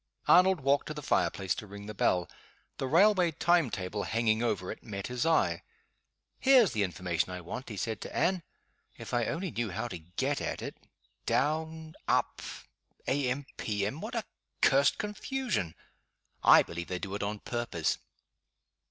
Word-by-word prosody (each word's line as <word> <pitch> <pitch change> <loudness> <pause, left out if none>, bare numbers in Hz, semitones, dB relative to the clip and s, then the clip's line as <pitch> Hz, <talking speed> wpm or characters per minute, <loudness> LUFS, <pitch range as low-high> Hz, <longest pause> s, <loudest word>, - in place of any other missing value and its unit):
Arnold 185 -2 +6
walked 140 +1 +2
to 155 - -5
the 150 - -6
fire - - +3
place 95 -3 -2
to 105 - -7
ring 100 +1 -9
the 105 - -6
bell. 90 -3 +2 0.5
The 135 - -1
railway 180 +3 +5
time 170 -2 +3
table 100 0 -3
hanging 110 +1 +1
over 100 -6 -1
it - - -8
met 100 -3 -6
his 125 +5 -1
eye. 165 -1 +2 0.8
"Here's 260 -6 +6
the 110 - -1
information 90 -2 -1
I 90 0 -5
want," 120 +10 -6
he 105 - -6
said 110 +2 -3
to - - -7
Anne; 185 0 +2 0.6
"if - - -8
I 120 -1 +2
only 170 - -2
knew 120 -2 -2
how 110 +6 -3
to 90 - -6
get 85 +2 -2
at - - -3
it. - - -5 0.5
'Down' 160 +2 0
'Up' - - +1 0.7
'A. 135 -1 +1
M.' 135 +3 -2
P. 105 -2 -1
M.' 130 +10 -4
What 225 +4 -5
a 230 - 0 0.4
cursed 140 0 +5
confusion! 210 - -2 0.7
I - - +8
believe 85 +1 -6
they 90 - -2
do 95 +1 -5
it 100 - -3
on 105 +1 -2
purpose." 115 -8 -2
120 Hz, 175 wpm, -30 LUFS, 100-160 Hz, 0.8 s, I